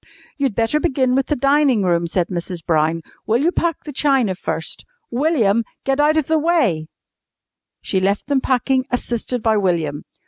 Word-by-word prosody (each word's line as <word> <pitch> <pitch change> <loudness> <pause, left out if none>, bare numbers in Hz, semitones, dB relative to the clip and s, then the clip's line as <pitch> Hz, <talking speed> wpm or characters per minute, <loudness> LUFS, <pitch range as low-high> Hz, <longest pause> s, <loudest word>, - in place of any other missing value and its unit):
"You'd 270 -7 -1
better 230 +6 +1
begin 260 -3 +1
with 270 +1 +1
the 295 - 0
dining 275 -4 +3
room," 170 -2 +1
said 175 0 -1
Mrs. 175 -1 -4
Brown. 160 0 +1 0.2
"Will 225 - +3
you 340 - +3
pack 340 -3 -1
the 300 - -7
china 265 -7 +2
first? 165 -3 -3 0.3
William, 235 -5 +2 0.2
get 270 +1 0
out 300 +2 +3
of 310 - +2
the 320 +1 +1
way!" 270 - +1 1.0
She 190 - 0
left 195 +2 0
them 280 -1 +1
packing, 260 0 +1
assisted 245 -1 -2
by 220 -1 +3
William. 165 -7 -1
245 Hz, 170 wpm, -20 LUFS, 185-280 Hz, 1.0 s, dining